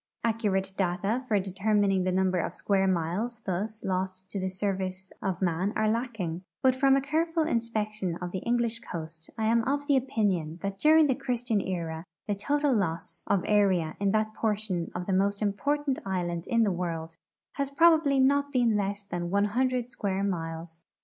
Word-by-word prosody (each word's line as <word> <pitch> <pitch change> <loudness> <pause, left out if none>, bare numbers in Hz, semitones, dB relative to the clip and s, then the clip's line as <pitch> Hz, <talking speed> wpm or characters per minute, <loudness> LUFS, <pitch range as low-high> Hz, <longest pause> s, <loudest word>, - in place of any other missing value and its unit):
Accurate 205 -4 0
data 200 +6 0
for 210 -4 +3
determining 195 0 +1
the 185 - +1
number 185 0 +2
of - - -3
square 195 -1 +1
miles 190 +7 -1
thus 205 +4 -3
lost 185 0 -3
to 200 - -3
the 190 0 -1
service 190 -1 -3
of 190 -1 -2
man 180 +4 0
are 215 0 +2
lacking, 215 -7 -2 0.2
but 260 -1 +5
from 270 +1 +4
a 275 - +2
careful 325 +3 0
inspection 215 - -1
of 175 0 -5
the 190 - -3
English 235 0 0
coast 160 -5 -8
I 220 - 0
am 230 +1 +3
of 285 +2 0
the 285 -2 +4
opinion 200 - 0
that 195 0 -3
during 315 +1 +6
the 275 - +3
Christian 245 -5 -1
era 165 -4 -3 0.2
the 205 - +1
total 290 +7 +1
loss 180 -5 -2
of 195 -3 +2
area 190 -6 +2
in 200 -1 +2
that 215 0 +1
portion 210 -6 -1
of 180 0 -3
the 195 - -1
most 200 +2 +2
important 275 +7 0
island 175 -3 -2
in 230 -1 +3
the 205 - +2
world 165 -2 -3 0.4
has 280 -1 -2
probably 315 -1 +4
been 260 - +5
not 285 +1 +1
less 205 -4 +1
than 175 -3 -4
one 200 +2 +2
hundred 250 +2 0
square 195 -4 -2
miles. 165 -3 -4
200 Hz, 180 wpm, -28 LUFS, 185-240 Hz, 0.4 s, during